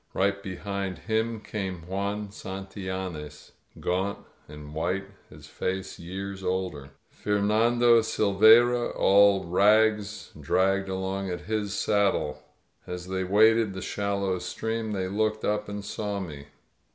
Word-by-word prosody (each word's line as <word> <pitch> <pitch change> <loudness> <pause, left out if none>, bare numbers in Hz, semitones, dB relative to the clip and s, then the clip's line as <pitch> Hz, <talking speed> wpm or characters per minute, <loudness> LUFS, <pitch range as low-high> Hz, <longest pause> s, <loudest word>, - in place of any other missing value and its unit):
Right 100 +1 +1
behind 100 0 -4
him 110 0 -1
came 95 -6 -5
Juan 100 +3 -3
Santillanes, 95 -6 -6 0.3
gaunt 95 +3 -1 0.3
and 75 0 -10
white, 90 +5 -1 0.2
his - - -13
face 95 +1 -4
years 95 +2 -6
older. 90 -7 -2 0.2
Fernando 115 +3 +3
Silveyra, 110 +4 +4
all 100 0 +5
rags, 105 +3 +2
dragged 95 +1 +1
along 95 +1 -3
at 90 -1 -4
his 105 +1 -2
saddle. 95 -9 +1 0.5
As 90 0 -6
they 95 0 -1
waded 110 +2 +4
the 95 - -5
shallow 100 -2 -1
stream 110 +4 -3
they 95 -2 -2
looked 110 +2 -1
up 105 0 -1
and 100 0 -5
saw 105 -1 -3
me. 75 -6 -7
100 Hz, 120 wpm, -27 LUFS, 95-105 Hz, 0.5 s, all